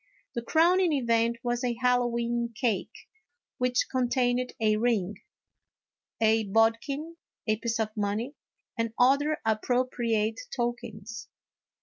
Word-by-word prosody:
The 240 Hz, -, -2 dB
crowning 340 Hz, +6 st, +3 dB
event 235 Hz, -3 st, +2 dB
was 240 Hz, +1 st, -1 dB
a 245 Hz, -1 st, 0 dB
Hallowe'en 240 Hz, -1 st, 0 dB
cake, 230 Hz, -5 st, -2 dB, 0.5 s
which 250 Hz, 0 st, +2 dB
con 255 Hz, -2 st, +1 dB
tained 250 Hz, 0 st, +1 dB
a 215 Hz, -1 st, +3 dB
ring, 215 Hz, -4 st, 0 dB, 1.0 s
a 220 Hz, 0 st, +3 dB
bodkin, 230 Hz, +10 st, +1 dB, 0.3 s
a 215 Hz, -1 st, +1 dB
piece 230 Hz, +1 st, -2 dB
of 215 Hz, -1 st, -2 dB
money, 210 Hz, +5 st, -2 dB, 0.4 s
and 230 Hz, -1 st, -2 dB
other 280 Hz, +4 st, +3 dB
appropriate 225 Hz, -1 st, 0 dB, 0.2 s
tokens. 230 Hz, -3 st, -4 dB
235 Hz, 110 wpm, -28 LUFS, 225-250 Hz, 1.0 s, crowning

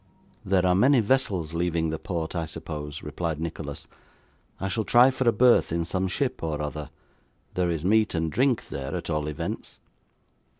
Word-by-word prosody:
'There 95 Hz, -1 st, +2 dB
are 90 Hz, -, +4 dB
many 130 Hz, +8 st, +5 dB
vessels 100 Hz, -9 st, +1 dB
leaving 85 Hz, -1 st, 0 dB
the 80 Hz, -, -3 dB
port, 85 Hz, -1 st, -4 dB
I 85 Hz, -2 st, -2 dB
suppose,' 75 Hz, -1 st, -6 dB
replied 80 Hz, 0 st, -3 dB
Nicholas. 80 Hz, -3 st, -5 dB, 0.7 s
'I 95 Hz, -, -2 dB
shall 110 Hz, +3 st, -1 dB
try 120 Hz, +5 st, +6 dB
for 130 Hz, -2 st, +2 dB
a -, -, +5 dB
berth 120 Hz, -2 st, +4 dB
in 85 Hz, 0 st, 0 dB
some 95 Hz, +2 st, -1 dB
ship 130 Hz, +7 st, -1 dB
or 80 Hz, -2 st, -2 dB
other. 75 Hz, 0 st, -4 dB, 0.6 s
There 90 Hz, -1 st, +1 dB
is 80 Hz, -1 st, -2 dB
meat 110 Hz, +1 st, +3 dB
and 80 Hz, -1 st, 0 dB
drink 130 Hz, -, +1 dB
there 70 Hz, 0 st, -4 dB
at -, -, -4 dB
all 75 Hz, -1 st, -1 dB
events. 75 Hz, -, -5 dB
85 Hz, 175 wpm, -26 LUFS, 80-110 Hz, 0.7 s, try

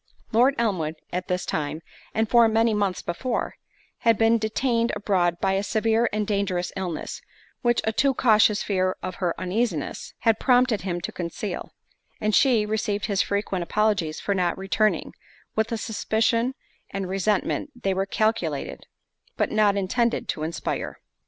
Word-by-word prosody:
Lord 250 Hz, +5 st, +4 dB
Elmwood 180 Hz, -9 st, 0 dB, 0.2 s
at 180 Hz, +1 st, -2 dB
this 180 Hz, 0 st, -1 dB
time, 155 Hz, +2 st, -3 dB, 0.3 s
and 220 Hz, 0 st, 0 dB
for 235 Hz, +1 st, +6 dB
many 225 Hz, 0 st, +3 dB
months 200 Hz, -3 st, 0 dB
before, 230 Hz, +8 st, -2 dB, 0.4 s
had 230 Hz, -2 st, +3 dB
been 225 Hz, +1 st, +4 dB
detained 230 Hz, +2 st, 0 dB
abroad 180 Hz, -4 st, +1 dB
by 195 Hz, 0 st, +1 dB
a 195 Hz, -, +1 dB
severe 225 Hz, +3 st, +1 dB
and 210 Hz, 0 st, -1 dB
dangerous 195 Hz, -4 st, -1 dB
illness, 180 Hz, -5 st, -4 dB, 0.4 s
which 240 Hz, -1 st, +2 dB
a 220 Hz, -, +1 dB
too 270 Hz, +3 st, +2 dB
cautious 215 Hz, -3 st, +4 dB
fear 185 Hz, -2 st, 0 dB
of 185 Hz, 0 st, -4 dB
her 175 Hz, -2 st, +1 dB
uneasiness, 185 Hz, -, -2 dB
had 225 Hz, -2 st, +3 dB
prompted 250 Hz, -4 st, +3 dB
him 175 Hz, -2 st, -3 dB
to -, -, -4 dB
conceal; 175 Hz, +2 st, -5 dB, 0.5 s
and 215 Hz, 0 st, 0 dB
she 235 Hz, -5 st, +4 dB
received 210 Hz, -1 st, -1 dB
his 200 Hz, -3 st, +1 dB
frequent 200 Hz, -2 st, -1 dB
apologies 200 Hz, -4 st, 0 dB
for 200 Hz, -, -1 dB
not 180 Hz, -3 st, 0 dB
returning, 205 Hz, +3 st, 0 dB, 0.4 s
with 220 Hz, +2 st, 0 dB
a 230 Hz, -, 0 dB
suspicion 230 Hz, +3 st, 0 dB, 0.3 s
and 195 Hz, -1 st, -4 dB
resentment 195 Hz, +8 st, 0 dB
they 195 Hz, -, +2 dB
were 190 Hz, +1 st, -1 dB
calculated, 195 Hz, -9 st, -1 dB, 0.5 s
but -, -, +1 dB
not 210 Hz, -2 st, +3 dB
intended, 235 Hz, +5 st, 0 dB
to -, -, -2 dB
inspire. 160 Hz, +2 st, -3 dB
210 Hz, 155 wpm, -25 LUFS, 185-225 Hz, 0.5 s, for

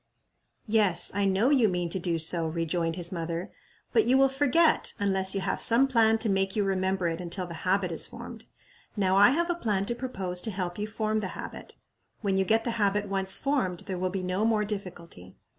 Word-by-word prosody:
"Yes, 205 Hz, -6 st, +3 dB
I 200 Hz, +1 st, 0 dB
know 195 Hz, +7 st, +2 dB
you 250 Hz, -7 st, +4 dB
mean 175 Hz, -2 st, -2 dB
to 190 Hz, -, -2 dB
do 170 Hz, -1 st, -1 dB
so," 165 Hz, +1 st, +4 dB
rejoined 165 Hz, 0 st, -2 dB
his 175 Hz, -1 st, 0 dB
mother, 170 Hz, +1 st, -4 dB, 0.4 s
"but 445 Hz, -, +3 dB
you 260 Hz, -, +3 dB
will 270 Hz, 0 st, +4 dB
forget, 290 Hz, +4 st, +2 dB
unless 190 Hz, -1 st, +2 dB
you 195 Hz, -, -1 dB
have -, -, -2 dB
some 240 Hz, +4 st, +4 dB
plan 225 Hz, -4 st, +3 dB
to 225 Hz, -, -2 dB
make 195 Hz, -1 st, 0 dB
you 210 Hz, -, +1 dB
remember 190 Hz, -1 st, -1 dB
it 165 Hz, +1 st, -3 dB
until 180 Hz, +1 st, -4 dB
the 170 Hz, -, -8 dB, 0.2 s
habit 190 Hz, -2 st, +1 dB
is 165 Hz, -, -1 dB
formed. -, -, -10 dB, 0.5 s
Now 190 Hz, -2 st, +1 dB
I 205 Hz, +4 st, +7 dB
have 340 Hz, +6 st, 0 dB
a -, -, +1 dB
plan 210 Hz, -, -2 dB
to 240 Hz, -, -2 dB
propose 195 Hz, -8 st, -3 dB
to 220 Hz, -, -4 dB
help 185 Hz, -2 st, -5 dB
you 210 Hz, -, -3 dB
form 215 Hz, 0 st, -2 dB
the 200 Hz, -, -3 dB
habit. -, -, -9 dB, 0.5 s
When 200 Hz, -3 st, 0 dB
you 190 Hz, 0 st, +1 dB
get 225 Hz, +3 st, +2 dB
the 235 Hz, -, -2 dB
habit 205 Hz, 0 st, 0 dB
once 190 Hz, -1 st, +2 dB
formed 255 Hz, -12 st, -1 dB
there 185 Hz, -2 st, -6 dB
will 185 Hz, 0 st, -1 dB
be 190 Hz, 0 st, -4 dB
no 185 Hz, +3 st, -1 dB
more 220 Hz, -2 st, +1 dB
difficulty. 175 Hz, -, -8 dB
195 Hz, 215 wpm, -27 LUFS, 180-220 Hz, 0.5 s, I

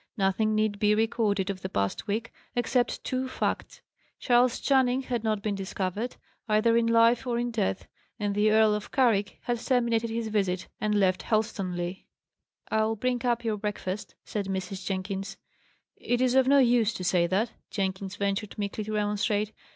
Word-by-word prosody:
Nothing 210 Hz, +2 st, +1 dB
need 215 Hz, -1 st, 0 dB
be 210 Hz, 0 st, +4 dB
recorded 210 Hz, -3 st, +1 dB
of 185 Hz, -1 st, -8 dB
the 190 Hz, -, -4 dB
past 100 Hz, -, -2 dB
week, 220 Hz, +3 st, -2 dB, 0.2 s
except 245 Hz, +1 st, 0 dB
two 260 Hz, 0 st, -2 dB
facts: -, -, -3 dB, 0.4 s
Charles 245 Hz, 0 st, +3 dB
Channing 265 Hz, -1 st, +2 dB
had 240 Hz, -3 st, -2 dB
not 215 Hz, -2 st, 0 dB
been 210 Hz, -, 0 dB
discovered, 195 Hz, +4 st, -3 dB, 0.3 s
either 215 Hz, +2 st, +3 dB
in 230 Hz, 0 st, +3 dB
life 230 Hz, +2 st, +4 dB
or 240 Hz, -1 st, 0 dB
in 240 Hz, 0 st, -1 dB
death; 205 Hz, -4 st, -1 dB, 0.3 s
and 205 Hz, -2 st, -1 dB
the 210 Hz, +1 st, +3 dB
Earl 215 Hz, 0 st, +5 dB
of 210 Hz, 0 st, -4 dB
Carrick 225 Hz, -7 st, +2 dB
had 240 Hz, -1 st, -1 dB
terminated 235 Hz, -2 st, +1 dB
his 225 Hz, 0 st, -2 dB
visit, 195 Hz, -4 st, 0 dB
and 210 Hz, 0 st, 0 dB
left 185 Hz, -2 st, +2 dB
Helstonleigh. 190 Hz, -5 st, -2 dB, 0.6 s
"I'll 220 Hz, 0 st, +2 dB
bring 245 Hz, +2 st, -1 dB
up 240 Hz, 0 st, +1 dB
your 220 Hz, -2 st, -1 dB
breakfast," 205 Hz, -1 st, -4 dB
said 205 Hz, -2 st, -3 dB
Mrs. 190 Hz, 0 st, -4 dB
Jenkins. 195 Hz, +1 st, -3 dB, 0.6 s
"It 245 Hz, -, -1 dB
is 255 Hz, -1 st, +2 dB
of 265 Hz, -1 st, +4 dB
no 280 Hz, +1 st, +6 dB
use 235 Hz, -4 st, +4 dB
to 185 Hz, -, -5 dB
say 175 Hz, -1 st, +2 dB
that," 205 Hz, +6 st, 0 dB, 0.2 s
Jenkins 190 Hz, 0 st, -3 dB
ventured 200 Hz, +1 st, -2 dB
meekly 205 Hz, +1 st, -3 dB
to 215 Hz, -, -4 dB
remonstrate. 210 Hz, 0 st, 0 dB
215 Hz, 170 wpm, -28 LUFS, 195-235 Hz, 0.6 s, no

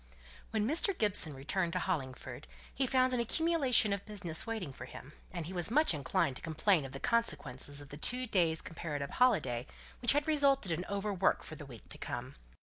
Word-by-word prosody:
When 215 Hz, -1 st, 0 dB
Mr. 340 Hz, -, +1 dB
Gibson 185 Hz, -8 st, +1 dB
returned 170 Hz, +6 st, -1 dB
to -, -, 0 dB
Hollingford, 135 Hz, -, -4 dB, 0.3 s
he 265 Hz, 0 st, 0 dB
found 255 Hz, 0 st, +3 dB
an 250 Hz, -, +1 dB
accumulation 260 Hz, -4 st, +3 dB
of 200 Hz, -, -3 dB
business 185 Hz, -4 st, -2 dB
waiting 210 Hz, -11 st, -4 dB
for -, -, -8 dB
him, 140 Hz, +3 st, -11 dB, 0.2 s
and 170 Hz, -3 st, -4 dB
he 180 Hz, -, -6 dB
was 175 Hz, 0 st, +1 dB
much 300 Hz, -, +5 dB
inclined 135 Hz, -2 st, 0 dB
to -, -, -13 dB
complain 160 Hz, 0 st, +2 dB
of 135 Hz, -, -8 dB
the 135 Hz, -, -7 dB
consequences 145 Hz, -, 0 dB
of 145 Hz, -, -12 dB
the 145 Hz, -, -8 dB
two 250 Hz, +10 st, 0 dB
days' 170 Hz, -7 st, +1 dB
comparative 150 Hz, -4 st, -5 dB
holiday, 135 Hz, -, +2 dB, 0.3 s
which 240 Hz, -, +6 dB
had 290 Hz, +1 st, +1 dB
resulted 280 Hz, -, +3 dB
in 170 Hz, +2 st, -2 dB
over 200 Hz, +1 st, -2 dB
work 190 Hz, 0 st, +2 dB
for -, -, -9 dB
the 150 Hz, -2 st, -9 dB
week 120 Hz, -5 st, -12 dB
to -, -, -7 dB
come. -, -, -5 dB
185 Hz, 195 wpm, -33 LUFS, 150-240 Hz, 0.3 s, which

